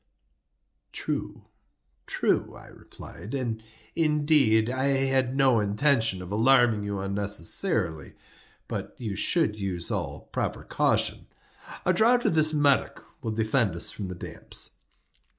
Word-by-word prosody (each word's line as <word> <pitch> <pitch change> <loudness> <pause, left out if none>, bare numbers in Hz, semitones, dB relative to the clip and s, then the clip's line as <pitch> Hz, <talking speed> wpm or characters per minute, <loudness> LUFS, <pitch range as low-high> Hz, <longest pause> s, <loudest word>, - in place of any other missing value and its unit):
"True—true," 65 0 -4
I - - -13
replied; 100 +10 -10
"and, 120 -4 -3 0.3
indeed, 150 -8 +3
I 130 +2 -1
had 135 -2 +1
no 135 -4 +4
intention 110 -2 +1
of 90 - -9
alarming 115 -1 +4
you 100 -1 -3
unnecessarily—but 95 -6 -3
you 110 -5 -4
should 110 - +1
use 90 -4 -3
all - - -3
proper - - -3
caution. - - 0 0.6
A 185 - +4
draught 235 +6 +3
of - - +3
this 155 -1 +4
Medoc 145 -3 +1 0.2
will 115 - -3
defend 110 -3 +1
us 85 - +1
from 100 - -6
the 90 - -6
damps." - - -4
115 Hz, 115 wpm, -26 LUFS, 100-140 Hz, 0.6 s, no